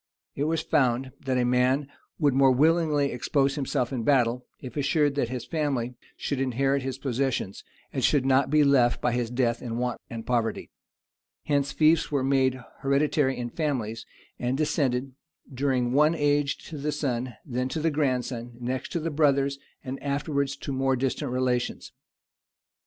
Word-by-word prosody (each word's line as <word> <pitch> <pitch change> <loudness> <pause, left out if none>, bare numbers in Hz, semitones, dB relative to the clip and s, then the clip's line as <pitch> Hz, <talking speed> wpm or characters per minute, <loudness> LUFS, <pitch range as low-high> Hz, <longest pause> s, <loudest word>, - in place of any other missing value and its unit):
It 140 - -1
was 160 0 0
found, 130 -3 +1 0.2
that 130 -1 +1
a 125 - +2
man 125 +3 +2 0.3
would 145 -4 +3
more 135 0 +5
willingly 150 0 +3
expose 135 +3 +1
himself 135 -3 -1
in 125 - -1
battle, 125 -1 +2
if 125 -3 -9
assured 145 +1 +2
that 140 -5 -1
his 125 -2 -4
family 140 -7 -1 0.2
should 140 - -2
inherit 135 +2 +1
his 130 0 -4
possessions, 130 -6 -2 0.3
and - - -2
should 140 -3 +3
not 135 0 +3
be 150 +1 +4
left 130 -4 +4
by 125 - +1
his 120 -1 -1
death 120 -1 0
in 115 -2 -4
want 125 0 -2
and 115 -1 -6
poverty; 115 -2 -1 0.7
hence 140 -1 +1
fiefs 160 0 +3
were 140 -3 +1
made 130 -1 +2 0.2
hereditary 140 0 +1
in 120 -1 -4
families, 125 -8 -2 0.3
and 125 +2 -1
descended, 135 -4 0 0.4
during 130 -2 0
one 150 +4 +4
age 145 -2 +1
to 155 - -6
the 150 +2 -1
son, 130 -4 -2
then 125 -2 -2
to 145 - -3
the 160 +1 +1
grandson, 125 -4 -1
next 125 +2 -3
to 170 - 0
the 165 +1 -3
brothers, 140 -2 +2 0.2
and 130 +1 -6
afterwards 140 -1 -1
to 140 - -5
more 135 0 +1
distant 130 -1 -2
relations. 125 -1 -1
135 Hz, 165 wpm, -26 LUFS, 125-145 Hz, 0.7 s, more